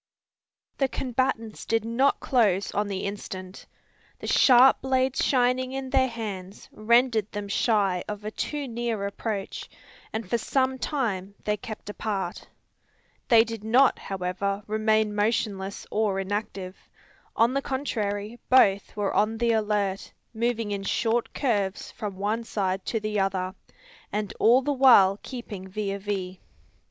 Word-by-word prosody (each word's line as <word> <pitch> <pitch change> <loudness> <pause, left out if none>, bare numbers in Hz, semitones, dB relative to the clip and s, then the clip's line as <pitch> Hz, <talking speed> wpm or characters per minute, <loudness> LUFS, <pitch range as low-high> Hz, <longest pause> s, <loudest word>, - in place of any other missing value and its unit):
The 270 - +3
combatants 250 -4 -2
did 225 -1 0
not 250 +5 +2
close 205 -7 +2
on 205 0 -1
the 195 -2 -3
instant. 190 -2 -7 0.5
The - - -9
sharp 255 0 +6
blades 260 0 +1
shining 255 0 +2
in 265 -1 -4
their 260 -1 +4
hands 205 -5 -7
rendered 230 -1 +2
them 205 0 -5
shy 200 -3 +1
of 210 0 -6
a 215 - -3
too 290 +4 -3
near 230 -3 -2
approach, 200 0 -4 0.4
and 220 -2 -4
for 235 +5 0
some 260 +2 0
time 205 -10 -2
they 210 - 0
kept 215 -1 -9
apart. 200 -4 -4 0.8
They 230 -2 +7
did 225 -2 -7
not, 250 +5 +4
however, 195 +2 -3
remain 215 0 +1
motionless 205 -2 -1
or 210 -3 +1
inactive. 195 -1 -4 0.6
On 230 +3 +3
the 275 - 0
contrary, 225 -5 -3
both 200 -6 +4
were 205 -2 -1
on 215 +2 +1
the 235 0 +2
alert, 210 -3 0 0.2
moving 230 -2 -1
in 200 -1 -2
short 225 +4 0
curves 205 -8 -1
from 205 -3 -6
one 210 +4 -1
side 195 -4 -2
to 225 - 0
the 210 -1 -2
other, 190 -1 -1 0.6
and 210 -1 -2
all 245 +4 +5
the 290 +2 0
while 220 -8 +6
keeping 215 -7 -7
vis 200 +1 -3
a - - -3
vis. 190 -2 -4
215 Hz, 145 wpm, -26 LUFS, 200-240 Hz, 0.8 s, They